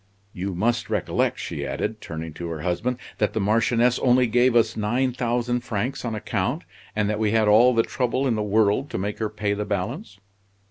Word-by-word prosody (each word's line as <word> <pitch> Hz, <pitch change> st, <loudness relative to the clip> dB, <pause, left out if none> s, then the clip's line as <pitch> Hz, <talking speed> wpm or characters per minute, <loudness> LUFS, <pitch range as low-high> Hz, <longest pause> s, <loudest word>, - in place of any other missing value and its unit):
"You 95 Hz, +1 st, -4 dB
must 115 Hz, +5 st, 0 dB
recollect," 105 Hz, -5 st, 0 dB
she 70 Hz, -, -5 dB
added, 105 Hz, +10 st, -3 dB
turning 80 Hz, -1 st, -6 dB
to 85 Hz, +2 st, -6 dB
her 80 Hz, -2 st, -5 dB
husband, 100 Hz, +10 st, -1 dB, 0.2 s
"that 105 Hz, -, +1 dB
the 110 Hz, -, -1 dB
Marchioness 115 Hz, +4 st, +2 dB
only 125 Hz, 0 st, +4 dB
gave 120 Hz, +1 st, +3 dB
us 115 Hz, -1 st, +3 dB
nine 120 Hz, +5 st, 0 dB
thousand 120 Hz, 0 st, -1 dB
francs 125 Hz, +2 st, -3 dB
on 115 Hz, -2 st, -2 dB
account, 110 Hz, -, -2 dB, 0.3 s
and 105 Hz, -1 st, +1 dB
that 105 Hz, 0 st, -1 dB
we 110 Hz, -1 st, +1 dB
had 110 Hz, -1 st, +3 dB
all 120 Hz, +4 st, +6 dB
the 115 Hz, -, +4 dB
trouble 130 Hz, -1 st, -1 dB
in 130 Hz, -, +2 dB
the 110 Hz, -, -1 dB
world 105 Hz, +5 st, +2 dB
to -, -, -4 dB
make 100 Hz, +3 st, -3 dB
her 110 Hz, -1 st, -1 dB
pay 105 Hz, -1 st, -1 dB
the 105 Hz, +1 st, -2 dB
balance." 105 Hz, -, -4 dB
110 Hz, 200 wpm, -24 LUFS, 105-120 Hz, 0.3 s, all